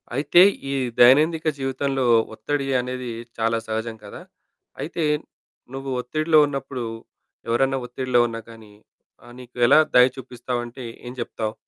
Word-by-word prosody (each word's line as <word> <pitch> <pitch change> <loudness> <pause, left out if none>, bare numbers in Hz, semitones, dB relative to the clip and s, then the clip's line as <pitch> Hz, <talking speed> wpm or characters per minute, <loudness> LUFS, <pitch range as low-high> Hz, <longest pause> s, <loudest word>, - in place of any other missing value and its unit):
అయితే, 155 +6 +4 0.3
ఈ - - -1 0.3
దైనందిక 155 +7 +5
జీవితంలో 135 0 -2 0.3
ఒత్తిడి 140 +6 -3 0.2
అనేది 125 -1 -5 0.3
చాలా 115 0 +1
సహజం 110 +1 -3
కదా! 100 - -10 0.6
అయితే, 165 +1 -3 0.7
నువ్వు 135 0 -6
ఒత్తిడిలో 155 +5 +2
ఉన్నప్పుడు, 135 -3 -5 0.6
ఎవరన్నా 135 +3 +1
ఒత్తిడిలో 125 0 0
ఉన్నా 115 -1 -6
కానీ, 110 -2 -14 0.5
ఆహ్, 120 0 -14
నీకు 125 -1 -14
ఎలా 155 - +7 0.2
దయ 125 0 +8
చూపిస్తావంటే 125 0 -6 0.2
ఏం 120 - -7
జెప్తావు? 110 -2 -4
125 Hz, 125 wpm, -23 LUFS, 120-135 Hz, 0.7 s, దయ